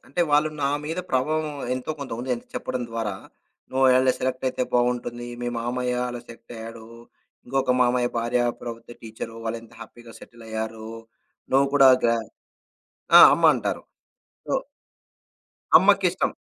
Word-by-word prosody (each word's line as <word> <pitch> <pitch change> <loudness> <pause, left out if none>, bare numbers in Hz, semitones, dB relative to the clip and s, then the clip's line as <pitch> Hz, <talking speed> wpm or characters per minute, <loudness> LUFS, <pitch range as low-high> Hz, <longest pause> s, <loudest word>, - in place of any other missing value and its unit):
అంటే, 175 - -3
వాళ్ళు 150 +1 +4
నా 140 - +2 0.2
మీద 160 +3 -4
ప్రభావం 155 +5 0 0.3
ఎంతో 130 +4 -4
కొంత 140 - -6
ఉంది. 125 +2 -6
ఎంత 120 - -12
చెప్పడం 125 - -3
ద్వారా 115 -4 -3 0.6
నువ్వు 130 +1 0
ఓవేళ 130 0 +5
సెలెక్ట్ 130 0 -3
అయితే 130 - -2
బావుంటుంది. 120 0 0 0.2
మీ 120 - -1
మామయ్య 125 +1 -2
అలా 120 -1 -6
సెట్ 115 0 -13
అయ్యాడు. 115 0 -9 0.6
ఇంకొక 135 0 +1
మామయ్య 125 0 +2
భార్య 120 +1 0 0.2
ప్రభుత్వ 115 0 -8
టీచరు, 115 0 -8
వాళ్లెంత 115 0 -6
హ్యాపీగా 120 -1 -12
సెటిల్ 115 -1 -14
అయ్యారు. 110 0 -5 0.6
నువ్వు 135 +1 +4
కూడా 135 -2 +7 0.2
గా 115 - +3 1.0
ఆ! - - +11
అమ్మ - - +2
అంటారు. - - -3 0.7
సో - - -4 1.3
అమ్మకిష్టం. 190 -2 +2
125 Hz, 140 wpm, -24 LUFS, 115-130 Hz, 1.3 s, ఆ